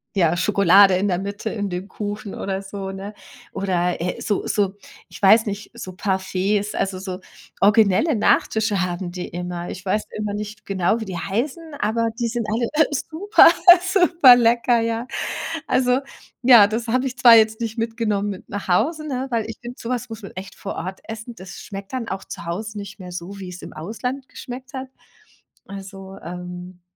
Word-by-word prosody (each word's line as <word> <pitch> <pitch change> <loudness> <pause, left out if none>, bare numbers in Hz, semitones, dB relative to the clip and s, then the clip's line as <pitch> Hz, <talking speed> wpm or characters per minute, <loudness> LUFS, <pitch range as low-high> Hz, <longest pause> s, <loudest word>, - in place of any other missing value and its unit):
ja, 175 -3 +2
Schokolade 195 0 +5
in 195 +3 +1
der 180 - +1
Mitte 200 +3 -4
in 205 -2 -3
dem 180 +2 -4
Kuchen 205 -1 -6
oder 195 0 -3
so, 195 -1 -6
ne? 195 +2 -7 0.4
Oder, 180 -3 -1
äh, 180 +1 -3
so 205 - -1
so 200 -2 0 0.3
ich - - -11
weiß 215 +4 +6
nicht, 205 +1 -5
so 185 -6 -7
Parfaits, 195 +2 -1
also, 190 -1 -1
so 185 -1 -6 0.4
originelle 210 - +4
Nachtische 215 -1 +2
haben 175 0 -3
die 180 0 -5
immer. 175 0 -5
Ich 190 - -8
weiß 210 +3 0 0.2
immer 210 -1 -2
nicht 210 0 -7
genau, 195 +3 +1
wie 220 - -4
die 185 -3 -5
heißen, 235 - -2 0.2
aber 230 +1 +1
die 235 - 0
sind 230 -1 -3
alle 230 +2 0 0.2
super, 325 +8 +4 0.5
superlecker, 245 - +5
ja. 230 +2 -2 0.6
Also 250 0 +2 0.4
ja, 240 -5 +8
das 225 +3 -3
habe 255 +3 +1
ich 255 - -6
zwar 240 -1 +8
jetzt 220 0 +4
nicht 225 0 -3
mitgenommen 225 -3 -1
mit 195 -2 -8
nach 205 0 -5
Hause, 305 - +1
ne, 260 -1 -2
weil 225 -2 0
finde 240 +1 -8
so 230 - -6
was 245 -2 -2
muss 225 0 -8
man - - -8
echt 195 +1 -8
vor 200 - -6
Ort 185 +3 -5
essen. 225 +2 -7
Das 185 0 -10
schmeckt 195 -1 -8
dann 240 -3 -3
auch 190 0 -4
zu - - -8
Hause 210 +5 -4
nicht 200 0 -8
mehr 180 -1 -9
so, 180 +3 -7
wie's 180 -2 -8
im - - -9
Ausland 250 - -5
geschmeckt 255 +1 -9
hat. 260 0 -6 0.8
Also, 195 0 -9
ähm, 180 +1 -8
205 Hz, 180 wpm, -22 LUFS, 190-230 Hz, 0.8 s, ja